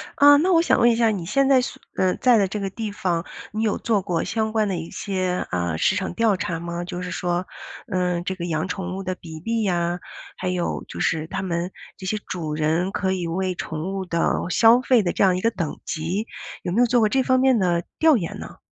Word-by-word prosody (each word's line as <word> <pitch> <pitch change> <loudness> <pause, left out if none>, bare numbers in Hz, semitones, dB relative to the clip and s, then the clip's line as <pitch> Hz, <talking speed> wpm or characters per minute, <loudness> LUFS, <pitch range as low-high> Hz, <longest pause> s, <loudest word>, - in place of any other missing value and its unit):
啊 285 0 +8
那 360 +4 +3
我 330 - +6
想 340 - +2
问 235 0 +6
一 - - +2
下 230 -1 +3
你 195 -6 -2
现 275 +9 +2
在 265 -2 +6
所 250 - -4 0.2
呃 185 -1 +2
在 245 -3 +5
的 200 -2 +3
这 210 +2 -4
个 195 -1 -2
地 215 +1 -5
方， 175 -3 -1 0.3
你 215 +1 -2
有 215 - +1
做 220 -3 +1
过 170 -2 -1
相 220 -1 -1
关 215 -2 +1
的 185 -3 -1
一 165 0 -6
些 185 -2 -2
呃 85 -2 -1
市 - - +3
场 190 - -2
调 225 -4 +2
查 165 -1 -3
吗？ 170 0 -4
就 175 0 -5
是 180 - -4
说， 175 0 -1 0.5
呃 180 -1 0
这 190 +1 -3
个 175 -1 -5
养 160 +1 -1
宠 185 0 -4
物 195 - -4
的 185 -1 -3
比 160 -3 -10
例 225 +5 -1
呀， 175 -2 0 0.4
还 185 - -4
有 180 -1 -2
就 - - -8
是 160 -1 0
它 170 - -4
们 175 0 -2 0.3
这 190 - -9
些 215 +3 -1
主 160 -4 -4
人 160 +5 0
可 190 -1 -1
以 185 -2 -2
为 185 +2 -1
宠 165 +5 -4
物 190 -1 -3
的 170 -1 -1 0.3
消 230 +5 +6
费 255 -3 +3
的 175 - 0
这 - - +1
样 185 -2 +4
一 185 - -2
个 230 - +3
等 175 -8 -4
级， 175 +8 -2 0.3
有 175 - -3
没 220 - +1
有 - - +6
做 240 0 +3
过 215 -1 +3
这 265 +1 +2
方 255 0 +3
面 260 -2 +4
的 175 -3 +1
调 315 -4 +5
研 170 -6 -4
呢？ - - -9
185 Hz, 265 characters per minute, -23 LUFS, 175-220 Hz, 0.5 s, 啊